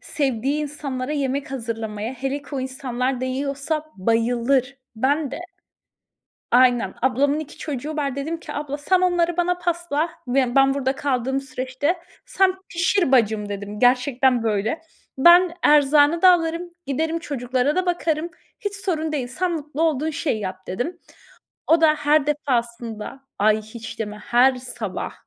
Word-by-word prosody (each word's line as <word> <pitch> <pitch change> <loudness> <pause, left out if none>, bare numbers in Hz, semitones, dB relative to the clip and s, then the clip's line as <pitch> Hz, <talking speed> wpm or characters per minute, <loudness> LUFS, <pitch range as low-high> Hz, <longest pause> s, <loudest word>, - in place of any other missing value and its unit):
sevdiği 275 +1 -1
insanlara 280 -2 -4
yemek 275 -1 -2
hazırlamayı. 225 -3 -4
Hele 270 +3 -3
ki - - -17
o 265 - -1
insanlar 260 -1 -2
değiyorsa 275 +4 -2
bayılır 240 +6 +1 0.2
Ben 280 +4 +1
de - - -5 1.1
Aynen. 245 -5 +4
Ablamın 275 +3 +2
2 310 -2 -8
çocuğu 300 +1 -4
var. 280 -3 -2
Dedim 320 +4 -3
ki, - - -8
"Abla 290 -1 -4
sen 365 +5 +2
onları 350 -2 +2
bana 355 0 +1
pasla, 340 -2 -1 0.2
be 255 -1 +1
ben 270 0 +5
burada 270 -1 0
kaldığım 265 -1 -1
süreçte. 265 +5 -2 0.3
Sen 385 -6 +2
pişir 345 -3 +1
bacım." 215 -4 +3
dedim. 205 +1 -6
Gerçekten 250 0 +3
böyle. 220 +7 -1 0.4
"Ben 345 +3 +7
erzağını 295 +2 +5
da 370 - +9
alırım 335 +1 -1 0.2
giderim 320 +4 -1
çocuklara 265 -1 -1
da 370 - +1
bakarım 335 -2 0 0.3
hiç 410 -1 -3
sorun 320 -5 -2
değil 265 -5 -1
sen 360 +8 -1
mutlu 305 -1 -3
olduğun 315 -1 +1
şeyi 280 -7 -2
yap." 185 -1 -6
dedim. 290 - -3 0.7
O 325 0 +4
da 315 -1 +5
her 295 -1 +2
defasında 235 -4 -2 0.2
Ay, 215 +1 +3
hiç 220 +1 -9
deme. 210 -1 -4
Her 250 +4 +3
sabah 245 -6 -5
275 Hz, 145 wpm, -22 LUFS, 245-315 Hz, 1.1 s, da